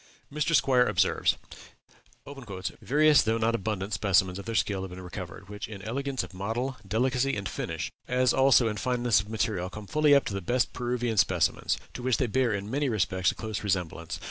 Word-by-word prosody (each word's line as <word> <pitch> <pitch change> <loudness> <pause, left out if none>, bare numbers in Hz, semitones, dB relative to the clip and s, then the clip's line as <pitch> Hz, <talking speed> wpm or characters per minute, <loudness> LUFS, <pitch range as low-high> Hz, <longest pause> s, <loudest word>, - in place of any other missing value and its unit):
Mr. 150 +2 +1
Squier 125 -2 +3
observes: 95 -2 +2 1.4
"Various 150 +1 +5
though 110 +1 +1
not 115 +1 +1
abundant 105 -2 -2
specimens 95 -2 +2
of 100 - -8
their 115 0 -4
skill 100 -3 +1
have 95 - -5
been 90 +1 -9
recovered, 90 +1 -8
which 105 0 -6
in 100 -3 -9
elegance 135 +4 -2
of - - -10
model, 115 +8 -3
delicacy, 125 +5 +1
and 100 -2 -3
finish, - - -4 0.2
as 125 0 +2
also 130 -3 +5
in 105 -1 -2
fineness 120 -1 +2
of 105 - -12
material, 105 -4 -1
come 105 +2 -9
fully 150 +5 +4
up 140 - +3
to - - -3
the 100 - -3
best 120 +7 0
Peruvian 120 -2 -2
specimens, 90 -4 +2 0.2
to - - -7
which 130 -1 +1
they 130 - +1
bear, 125 +1 +1
in 100 -1 -3
many 140 +1 0
respects, 95 -4 +1
a - - -12
close 110 -2 -5
resemblance. 90 -4 -2
110 Hz, 195 wpm, -28 LUFS, 95-125 Hz, 1.4 s, Various